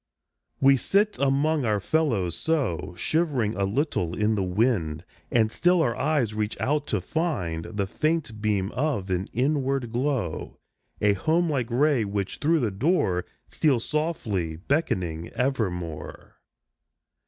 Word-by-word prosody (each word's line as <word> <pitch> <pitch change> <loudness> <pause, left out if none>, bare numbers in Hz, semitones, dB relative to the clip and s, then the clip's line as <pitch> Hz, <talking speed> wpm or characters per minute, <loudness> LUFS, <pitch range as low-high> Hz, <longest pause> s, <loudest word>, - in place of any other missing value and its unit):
We 135 0 +6
sit 205 - +1
among 140 +2 +2
our 105 -3 +1
fellows 110 - +1
so, 125 - -1
Shivering 140 - 0
a 100 - 0
little 100 - -1
in 105 +1 +2
the 105 - 0
wind, 90 -5 0 0.2
And 110 -2 +2
still 175 +3 +3
our 120 -5 0
eyes 140 -8 +1
reach 105 0 -2
out 150 +1 0
to 105 - 0
find 90 - -2
The 100 -2 -2
faint 140 -1 -1
beam 105 -2 0
of 125 -10 -1
an 90 +1 -1
inward 135 -1 0
glow 120 - -2 0.4
A 105 -1 +4
home 160 - +1
like 130 -5 -1
ray, 135 0 +3
which 100 -1 -3
through 160 +1 +2
the 110 -4 0
door 95 - +1 0.2
Steals, 135 -7 +1
softly 110 - -1
beckoning, 85 - -1
evermore. 90 - -3
115 Hz, 135 wpm, -26 LUFS, 95-150 Hz, 0.4 s, We